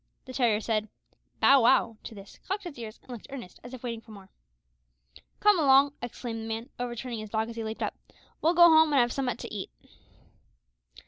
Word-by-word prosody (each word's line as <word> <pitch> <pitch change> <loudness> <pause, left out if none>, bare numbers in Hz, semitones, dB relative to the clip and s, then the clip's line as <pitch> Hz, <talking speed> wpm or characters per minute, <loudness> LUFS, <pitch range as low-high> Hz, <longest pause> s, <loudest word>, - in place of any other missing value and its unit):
The 260 - -9
terrier 235 -5 +2
said 220 -1 -1 0.5
"Bow 275 -1 +6
wow" 230 -2 +3
to 225 - -8
this, 195 -1 -13
cocked 395 +1 -3
its 300 -8 -8
ears, 220 -1 -8
and - - -13
looked 235 -4 -9
earnest, 255 -10 -9
as 245 - -10
if 255 -2 -10
waiting 230 -2 -4
for 225 - -22
more. 200 -3 -13 1.1
"Come 415 -3 +4
along," 280 -1 +5
exclaimed 235 -1 -6
the - - -6
man, 225 +3 -5
overturning 240 -1 -4
his 215 -1 -7
dog 220 +1 -1
as - - -10
he 230 - -4
leaped 220 0 -4
up, - - -2 0.5
"we'll 330 +3 +2
go 345 0 +9
home 315 -2 +5
and 275 - +5
have 240 -1 +2
summat 255 -4 -2
to - - -8
eat." 200 -3 -5
240 Hz, 205 wpm, -28 LUFS, 220-275 Hz, 1.1 s, go